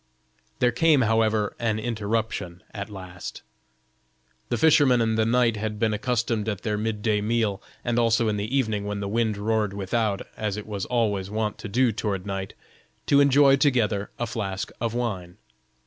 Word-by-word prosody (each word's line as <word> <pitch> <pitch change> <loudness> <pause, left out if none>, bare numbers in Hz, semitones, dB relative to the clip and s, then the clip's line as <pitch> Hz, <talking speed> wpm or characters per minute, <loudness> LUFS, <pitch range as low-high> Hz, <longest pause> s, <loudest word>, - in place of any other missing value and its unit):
There 125 -1 +3
came, 150 +2 +4
however, 110 -2 +2
an 110 -2 0
interruption 110 -5 -3
at 100 +1 -5
last. 95 -3 -8 1.1
The 120 - 0
fisherman 140 -2 +5
and 110 -1 +1
the 110 0 +2
knight 120 -2 +3
had 105 0 -3
been 110 0 +1
accustomed 115 -1 -1
at 105 -4 -4
their 105 -1 0
mid 105 0 -3
day 105 -2 +2
meal, 110 -2 0 0.2
and 120 -1 +1
also 115 0 +3
in 105 - +1
the 105 +6 -1
evening 110 -6 0
when 105 0 -3
the 100 - -3
wind 110 0 0
roared 105 -1 0
without, 100 +1 -1
as 105 -2 -2
it 105 - -6
was 100 -3 -4
always 105 -6 0
wont 105 0 -2
to - - -6
do 125 +3 +3
toward 100 -3 -3
night, 95 -1 -4 0.5
to 140 0 +5
enjoy 140 0 +6
together 115 -8 +1
a 120 - -1
flask 105 -2 -4
of 115 -1 -1
wine. 95 -8 -3
110 Hz, 175 wpm, -25 LUFS, 105-120 Hz, 1.1 s, enjoy